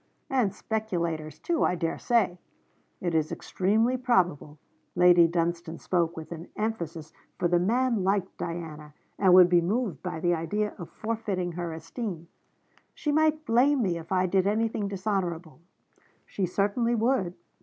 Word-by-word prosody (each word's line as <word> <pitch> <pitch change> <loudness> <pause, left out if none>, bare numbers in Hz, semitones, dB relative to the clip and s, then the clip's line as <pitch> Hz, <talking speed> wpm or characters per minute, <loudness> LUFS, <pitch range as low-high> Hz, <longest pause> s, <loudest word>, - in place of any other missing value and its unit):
'And 250 -7 +2
speculators 170 -10 -3
too, 340 -1 0
I 180 - +2
dare 165 -1 -2
say!' 230 -7 +1 0.6
'It 175 -2 -1
is 155 -1 +1
extremely 220 +7 +1
probable.' 180 - +1 0.4
Lady 175 -1 +6
Dunstane 170 0 -2
spoke 170 -2 -1
with 160 +1 -8
an 170 +1 -7
emphasis, 170 -8 -4 0.2
for 175 - +1
the 175 0 +3
man 230 +2 +1
liked 195 0 0
Diana, 155 -3 -6 0.2
and 190 -2 +5
would 180 -1 +9
be 175 -1 +4
moved 195 - -1
by - - -4
the 175 +1 +2
idea 205 +6 -1
of 170 - -7
forfeiting 215 -5 -3
her 170 0 -4
esteem. 170 +1 -6 0.7
'She 295 - -1
might 310 0 +2
blame 255 +3 +3
me 175 -4 0
if 165 +2 -12
I 185 -1 +2
did 190 +1 +2
anything 215 0 0
dishonourable!' 185 -5 -3 0.7
'She 190 -3 -2
certainly 205 +6 +1
would.' 220 -6 +1
185 Hz, 150 wpm, -27 LUFS, 170-220 Hz, 0.7 s, would